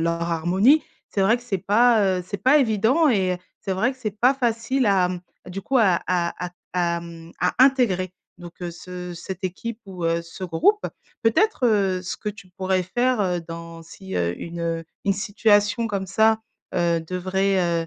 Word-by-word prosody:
leur 170 0 0
harmonie. 190 - +3 0.3
C'est 195 - 0
vrai 220 +5 +4
que 240 - -15
c'est 220 -6 -2
pas, 205 -1 +3
heu, - - -4
c'est 200 - -4
pas 270 +4 +6
évident 255 +5 +3
et 185 -7 +1 0.2
c'est 195 - -2
vrai 230 +8 +1
que - - -17
c'est 215 -4 -2
pas 255 +3 +5
facile 245 +1 0
à, 190 -3 +3
mmh, 180 -1 -4 0.3
du 190 +2 -6
coup 265 +4 +1
à 190 -6 +4
à 175 -1 -1
à - - -9 0.2
à 170 -1 +1
à - - -8
mmh, 170 0 -11
à 180 - +1
intégrer 200 -10 +2 0.3
donc, 175 -1 -10
heu, 175 - -4
ce 180 +1 -8
cette 185 +2 -7
équipe 215 +5 -4
ou, 180 -3 -6
heu, 165 0 +1
ce 170 +3 -8
groupe. 185 - +2 0.4
Peut-être, 320 - +2
heu, 195 -4 +2
ce 180 - -5
que 210 - -4
tu 200 -2 -9
pourrais 185 -1 +1
faire, 245 +6 0
heu, 180 -2 0
dans 165 0 -9
si 190 +3 -10
heu, 85 0 0
une 170 0 -6
heu, 165 0 -2 0.2
une 195 - +3
situation 205 +2 +2
comme 200 -3 -3
ça, 220 +3 +3 0.4
heu, 170 -2 +2
devrait, 180 -1 0
190 Hz, 195 wpm, -23 LUFS, 175-220 Hz, 0.4 s, pas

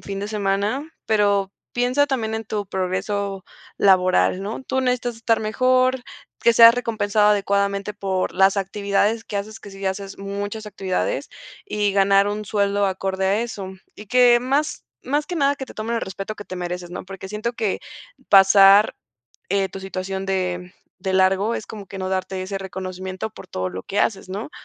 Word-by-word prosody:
fin 195 -1 -6
de 205 - -4
semana. 210 +7 -1
Pero 200 -2 +2 0.2
piensa 250 +4 +2
también 225 -5 -2
en 225 0 -4
tu 210 -1 -3
progreso 195 +1 -2 0.3
laboral, 185 -1 +3
¿no? 215 +6 -5
Tú 265 0 -1
necesitas 250 -2 -1
estar 225 0 +1
mejor, 255 +3 +2 0.4
que 235 - +5
seas 230 +1 +9
recompensado 215 -3 +1
adecuadamente 200 0 +1
por 195 -2 -2
las 190 +1 +4
actividades 200 +3 0
que 205 - -5
haces, 215 +2 -5
que 200 - -11
sí 195 0 -12
ya 190 - 0
haces 195 0 -7
muchas 200 +2 -5
actividades, 200 - -2 0.4
y 205 - 0
ganar 195 0 +4
un 210 0 -4
sueldo 200 -1 +1
acorde 190 0 -1
a 200 +3 +2
eso. 200 -5 -6 0.2
Y 210 - -11
que 245 +1 +5
más 275 +5 -1 0.2
más 290 +3 0
que 360 - -4
nada 280 -1 +3
que 265 - -6
te - - -12
tomen 230 +2 -2
el - - -1
respeto 195 +3 -5
que 205 - -8
te - - -7
mereces, 180 0 -5
¿no?, 180 - -6
porque 190 0 -9
siento 215 +4 -3
que 220 -4 -1 0.5
pasar, 195 +1 +7 0.5
eh, 195 0 +1
tu 195 - -8
situación 190 0 -4
de, 180 -1 -2 0.3
de 190 +1 -3
largo 190 +4 +3
es 210 - -5
como 205 -3 -9
que 195 +2 -8
no 185 0 -3
darte 190 0 -2
ese 195 +1 -4
reconocimiento 185 +1 -5
por - - -13
todo 95 0 -3
lo 95 +1 -6
que 205 - -3
haces, 195 -3 -1
¿no?, 200 +8 -5
200 Hz, 185 wpm, -22 LUFS, 190-220 Hz, 0.5 s, seas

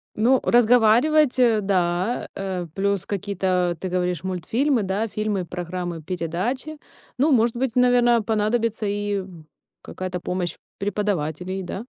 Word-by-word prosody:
Ну, 250 +5 +3
разговаривать, 245 +5 +4
э, 230 -4 +4
да. 185 +2 0
Э, 190 -2 -3
плюс 200 0 0
какие-то, 185 -3 -1
ты 185 - -4
говоришь, 180 -2 -1
мультфильмы, 225 - 0
да, 195 +4 -1
фильмы, 210 -3 -2
программы, 175 -1 -5
передачи. 185 - -3 0.4
Ну, 295 +5 +3
может 235 -2 +3
быть, 250 -1 -2
наверно, 245 -1 +4
понадобится 220 +1 0
и, 205 0 -1
м, 175 -5 -11 0.3
какая-то 185 -1 -5
помощь 180 0 -3 0.2
преподавателей, 190 -3 -2
да. 195 +5 -6
200 Hz, 125 wpm, -23 LUFS, 180-235 Hz, 0.4 s, разговаривать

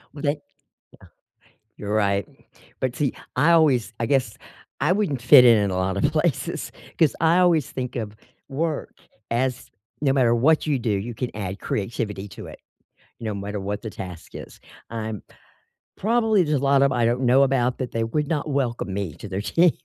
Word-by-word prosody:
W 145 - -8
they? 145 - +2
Yeah. - - -21 1.4
You're 105 0 -3
right, 100 -2 +1 0.5
but 130 -1 -1
see, 140 0 0 0.2
I 165 +3 +4
always, 135 -9 +3
I 115 - -1
guess, 130 -6 +1 0.5
I 150 +6 +3
wouldn't 185 - 0
fit 125 +1 +8
in 115 -2 +7
in 100 -1 +1
a 90 - -2
lot 95 0 0
of 145 +8 +2
places 155 -2 -1 0.3
'cause 160 -4 +3
I 165 +2 +4
always 170 -6 +3
think 125 -1 -5
of 110 -4 -4 0.3
work 155 +2 -3 0.4
as 125 +1 -1 0.3
no 140 -3 +3
matter 125 -4 +3
what 155 +6 +3
you 140 -4 +1
do, 115 - -2
you 100 +4 -2
can 120 +2 -3
add 100 -1 -5
creativity 105 -1 -3
to - - -10
it - - -11 0.6
no 110 -2 -3
matter 100 +1 -4
what 100 +2 -4
the 110 - -5
task 90 -5 -9
is, - - -10 0.3
I'm 110 -3 -5 0.7
probably, 220 -2 +2
there's 150 -4 0
a - - -5
lot 140 0 +4
of 140 - +3
I 120 -2 +1
don't 120 +3 +1
know 130 +2 +5
about 130 -2 +1
that 130 -2 -3
they 115 - -1
would 145 +7 -1
not 150 -1 -2
welcome 120 -8 -1
me 95 -5 -3
to 105 - -9
their 95 +1 -3
team, 165 +9 +3
125 Hz, 190 wpm, -23 LUFS, 105-145 Hz, 1.4 s, fit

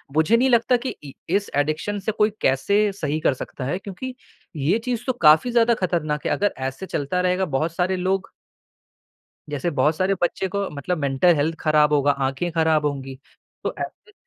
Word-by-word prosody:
मुझे 160 +9 +4
नहीं 260 +2 +3
लगता 240 +1 +4
कि - - -3
इ 140 - -8 0.2
इस 205 0 0
एडिक्शन 155 +8 -1
से - - +3
कोई 210 +1 +2
कैसे 135 +10 +2 0.2
सही 155 -5 -2
कर 140 - +2
सकता 130 0 -7
है, 145 +7 -1
क्योंकि 250 +7 -7 0.4
ये 150 +9 +1
चीज़ 245 -2 -2
तो 255 - +2
काफ़ी 155 +11 +6
ज़्यादा 235 0 +4
खतरनाक 165 -7 -1
है। - - 0
अगर 205 0 +1
ऐसे 135 +8 -6
चलता 165 +3 -2
रहेगा, 180 +1 +1
बहुत 155 +2 -1
सारे 185 +1 +1
लोग 190 +1 -1 1.2
जैसे 145 +4 -2
बहुत 150 +4 +3
सारे 190 +3 +1
बच्चे 190 +2 0
को 200 0 -2
मतलब 150 +5 -3
मेंटल 140 +4 +3
हेल्थ 155 +3 0
खराब 150 -1 +3
होगा, 145 0 +4
आँखें 135 +5 -2
खराब 160 -2 +2
होंगी। 135 -2 -4 0.4
तो - - -2
ऐसे 425 - -7
165 Hz, 185 wpm, -23 LUFS, 145-200 Hz, 1.2 s, काफ़ी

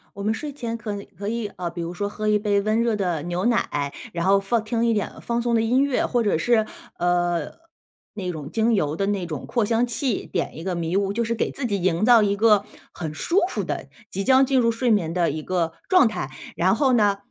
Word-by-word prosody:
我 200 - -6
们 215 - +1
睡 290 +5 -5
前 235 -4 -4
可 215 -2 -5
能 200 0 -6
可 200 +2 -5
以， 230 0 -2
呃， 175 -1 -3
比 170 +1 -6
如 170 +1 -4
说 205 +3 -2
喝 215 +1 -2
一 210 0 +3
杯 205 -1 +1
温 215 +2 +1
热 235 -2 +1
的 180 -6 -1
牛 175 +1 -2
奶， 145 -12 0 0.2
然 170 0 -2
后 195 +1 +5
放 215 +3 0
听 230 +1 0
一 230 - +3
点 210 -2 -1
放 235 0 -1
松 240 0 0
的 225 - +3
音 250 +4 +3
乐， 280 -2 +1
或 240 -2 +1
者 205 -6 +2
是， 225 +4 +2 0.3
呃， 175 -2 0 0.6
那 185 -3 -4
种 150 -4 -7
精 225 +1 +1
油 155 -7 +1
的 195 +4 -1
那 200 -3 -1
种 155 -5 -5
扩 235 -4 0
香 230 +3 +2
器 240 -1 -2
点 170 - -3
一 160 - -7
个 185 0 -2
迷 170 +1 -2
雾， 195 0 +1
就 235 +3 -1
是 230 +1 -1
给 - - -1
自 275 - -4
己 200 -5 -1
营 180 +2 +2
造 235 -3 +7
一 200 0 +1
个 210 -2 +4 0.3
很 160 -3 -5
舒 340 - +1
服 - - -2
的， - - -4 0.2
即 195 +1 -3
将 265 +2 +5
进 265 0 +1
入 230 -2 +4
睡 240 +2 -1
眠 180 -7 +2
的 175 -1 +2
一 155 +1 -5
个 170 -2 -1 0.2
状 365 -9 +6
态。 215 -10 -4 0.3
然 185 +3 +3
后 265 +1 +2
呢， 205 -4 +3
205 Hz, 265 characters per minute, -23 LUFS, 175-230 Hz, 0.6 s, 造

